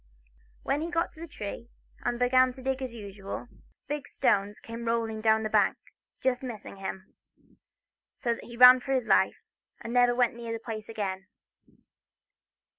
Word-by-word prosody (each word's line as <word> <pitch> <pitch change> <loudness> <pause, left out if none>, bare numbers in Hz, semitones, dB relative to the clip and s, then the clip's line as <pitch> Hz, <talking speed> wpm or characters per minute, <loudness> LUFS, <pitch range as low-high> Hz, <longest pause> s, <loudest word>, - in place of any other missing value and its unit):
When 290 - 0
he 330 - -3
got 335 0 0
to 315 - -17
the 335 - -7
tree, 230 -3 -7 0.3
and 240 0 0
began 255 +1 +4
to 260 - -12
dig 265 0 -1
as 260 -2 -4
usual, 200 +1 -7 0.4
big 295 0 -4
stones 200 +1 +1
came 230 +1 -7
rolling 225 -1 -1
down 220 0 +3
the - - 0
bank, - - +3 0.5
just 260 -1 +1
missing 230 -6 -7
him, 190 0 -7 1.0
so 235 -2 0
that - - -9
he 235 0 -10
ran 250 +1 +10
for 270 +2 -3
his 255 -3 +1
life, - - +3 0.4
and 230 - -6
never 245 -1 +4
went 245 -1 +3
near 235 -1 -6
the - - -2
place 220 -1 -7
again. 195 -4 -4
235 Hz, 170 wpm, -28 LUFS, 220-255 Hz, 1.0 s, ran